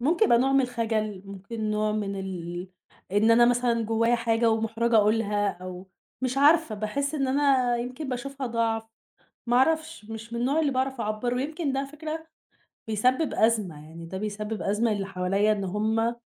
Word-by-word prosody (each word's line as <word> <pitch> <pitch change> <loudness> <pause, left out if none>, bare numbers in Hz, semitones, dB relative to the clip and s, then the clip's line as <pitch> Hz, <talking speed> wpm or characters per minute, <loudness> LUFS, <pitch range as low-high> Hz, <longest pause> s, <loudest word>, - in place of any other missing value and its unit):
ممكن 335 - +3
يبقى 235 - +5
نوع 270 +2 +2
من 275 - +5
الخَجَل، 220 -5 -2
ممكن 205 +3 -5
نوع 215 0 0
من 200 -2 -2
ال 180 -1 -5 0.4
إن 215 +3 +4
أنا 240 +1 +7
مثلًا 245 -1 +2
جوايا 230 +2 +2
حاجة 230 0 +2
ومُحْرَجة 225 +1 +1
أقولها 210 -1 +2
أو 185 +1 -8 0.3
مش 255 +1 0
عارفة 300 -4 +4
باحس 275 +8 -2
إن 275 -3 0
أنا 265 -3 +3
يمكن 255 +5 -5
باشوفها 270 +2 -4
ضَعف، 230 -1 0 0.7
ما 240 +1 +3
أعرفش 315 -2 +1
مش 225 +1 -8
من 235 - -2
النوع 275 +6 +1
اللي 295 -3 +1
باعرف 260 -1 -1
اعبّر 215 +3 -1
ويمكن 290 +4 -2
ده 270 - 0
على 275 - -3
فكرة، 315 +2 -6 0.6
بيسبّب 255 +8 +1
أزمة 205 -10 +1
يعني، 165 +1 -10
ده 190 +3 -6
بيسبّب 210 +1 -4
أزمة 215 +3 +1
للي 200 -2 -2
حواليّا 195 +3 +1
إن 200 -2 -2
هُم، 220 +4 0
230 Hz, 175 wpm, -26 LUFS, 210-260 Hz, 0.7 s, أنا